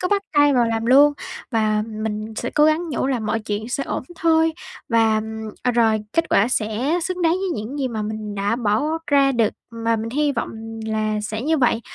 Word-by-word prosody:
cứ 365 - -1
bắt 400 0 +1
tay 290 -1 +4
vào 245 -2 +4
làm 225 0 -1
luôn 285 +3 +6 0.4
và 215 -3 +1
mình 215 0 -4
sẽ 245 - -3
cố 300 - +3
gắng 310 +3 +2
nhủ 265 - -1
là 265 -2 0
mọi 215 +1 -1
chuyện 210 +1 -4
sẽ 275 +2 -2
ổn - - -3
thôi. 325 -1 +3 0.4
Và, 225 -2 +3
ừm, 220 0 -6
à, 250 - +2
rồi 225 -2 +3
kết 330 - +1
quả 205 +5 +4
sẽ 245 +8 0
xứng 365 0 -3
đáng 325 - +4
với 375 +2 -1
những 255 +7 -6
gì 265 -2 0
mà 220 -3 -3
mình 210 -1 -5
đã 205 +3 0
bỏ 215 -2 +1 0.2
ra 280 -1 +4
được 230 -4 +2 0.2
mà 230 0 -1
mình 225 +1 -4
hy 295 +2 +1
vọng - - -3 0.4
là 215 -1 -1
sẽ 215 +2 -4
như 315 +3 +1
vậy. 245 -3 +2
230 Hz, 220 wpm, -21 LUFS, 215-290 Hz, 0.4 s, luôn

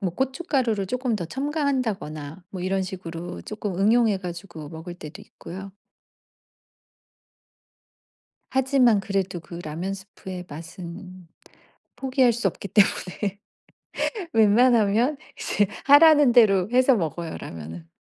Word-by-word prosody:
뭐 190 -4 -1
고춧가루를 260 - 0
쪼끔 250 +2 -1
더 175 - -4
첨가한다거나 230 - -2
뭐 185 - -6
이런 190 +1 0
식으로 175 -2 -6
조끔 210 -4 -5
응용해 220 0 +3
가지고 175 -4 -8
먹을 160 +3 -8
때도 155 -3 -10
있고요. 190 +3 -10 2.8
하지만 260 -4 +4
그래도 195 -2 -2
그 170 +1 -10
라면 165 +6 -4
스프의 190 -2 -9
맛은 175 +3 -9 0.7
포기할 260 -2 +2
수 230 -2 -1
없기 195 +2 -3
때문에 200 0 +1 0.9
웬만하면 225 +3 +4 0.2
이제 205 - +1 0.2
하라는 290 -2 +7
대로 200 -6 +5
해서 255 +2 +5
먹어요, 165 -2 -3
라면은. 80 +1 -9
195 Hz, 260 characters per minute, -24 LUFS, 175-245 Hz, 2.8 s, 하라는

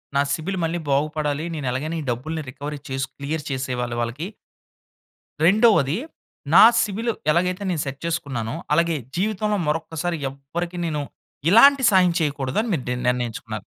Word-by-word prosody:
నా 140 - +4
సిబిల్ 180 +6 -3
మళ్ళీ 165 +1 -1
బాగుపడాలి. 150 +1 0
నేను 150 -4 -4
ఎలాగైనా 150 +6 -3
ఈ - - -6
డబ్బుల్ని 155 +7 -4
రికవరీ 145 +3 -6
చేసి, 135 0 -1
క్లియర్ 150 +2 -4
చేసేవాళ్ళి 125 -2 -2
వాళ్ళకి. 120 +9 -3 1.2
రెండోవది, 195 - +4 0.6
నా - - +9 0.2
సిబిల్ 225 +3 -1 0.2
ఎలాగైతే 180 +4 0
నేను 170 -4 -1
సెట్ 135 0 -5
చేసుకున్నానో, 140 -8 -3 0.2
అలాగే 170 +1 +2 0.2
జీవితంలో 210 +2 0
మరొక్కసారి 160 +2 -2
ఎవరికీ 165 +6 -6
నేను, 150 -2 -2 0.5
ఇలాంటి 270 +6 +7
సాయం 185 -3 +4
చేయకూడదు 145 -3 -1
అని 235 - -4
మీరు 135 - -1
నిర్ణ 125 0 -3
నిర్ణయించుకున్నారు. 125 -2 -3
155 Hz, 140 wpm, -23 LUFS, 135-175 Hz, 1.2 s, నా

